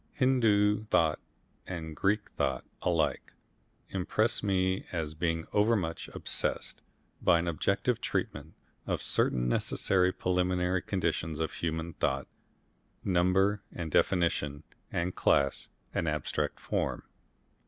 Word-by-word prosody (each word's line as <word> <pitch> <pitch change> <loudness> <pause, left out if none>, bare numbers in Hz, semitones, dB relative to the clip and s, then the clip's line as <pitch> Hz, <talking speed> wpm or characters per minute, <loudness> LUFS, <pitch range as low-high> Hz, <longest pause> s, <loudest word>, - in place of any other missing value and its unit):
Hindoo 110 -5 +3
thought 80 -7 +2 0.5
and 80 -3 -5
Greek 105 +4 0
thought 65 - -1 0.2
alike - - 0 0.6
impress 100 +4 0
me 95 -2 +1
as 80 -3 -2
being 80 0 -1
overmuch 105 -6 +1
obsessed - - -2 0.4
by 85 - +5
an 85 +1 -1
objective 85 -3 0
treatment 75 +3 -3 0.3
of - - 0
certain 60 -1 +2
necessary 90 +8 +2
preliminary 90 0 +1
conditions 80 -5 -1
of 80 - -1
human 80 0 -3
thought 65 0 -1 0.8
number 95 +3 +3
and 85 -3 -5
definition 80 -5 +1 0.3
and 90 +2 -1
class 70 -1 +2 0.2
and 85 - 0
abstract 75 -2 -2
form. - - -2
90 Hz, 110 wpm, -30 LUFS, 80-95 Hz, 0.8 s, by